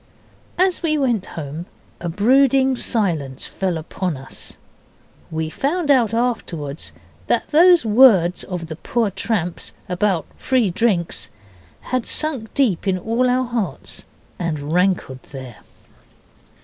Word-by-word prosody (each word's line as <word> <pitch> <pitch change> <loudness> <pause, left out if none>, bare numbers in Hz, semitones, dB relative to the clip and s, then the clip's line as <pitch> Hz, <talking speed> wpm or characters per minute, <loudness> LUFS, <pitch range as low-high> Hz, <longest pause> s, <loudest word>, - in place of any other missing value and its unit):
As 370 0 +2
we 310 -3 +1
went 240 -9 0
home 155 +3 -6 0.3
a 170 - -4
brooding 265 +7 +4
silence 165 - -1
fell 185 -3 -2
upon 165 0 -3
us; 130 0 -10 0.8
we 160 0 -2
found 290 - 0
out 245 -5 +4
afterwards 190 - -2 0.4
that - - +1
those 345 -1 +6
words 210 -6 +5
of 180 -3 -5
the 160 -1 -7
poor 225 +2 -1
tramp's 180 -4 -2
about 180 -1 0
free 250 -7 +1
drinks 185 -4 0 0.6
had 255 -2 0
sunk 275 -8 -2
deep 215 -9 +1
in 190 -1 +2
all 230 +6 +1
our 255 +1 +2
hearts, 225 - -4 0.4
and 155 -3 -3
rankled 180 -8 +1
there. 130 -5 -8
200 Hz, 125 wpm, -21 LUFS, 165-255 Hz, 0.8 s, those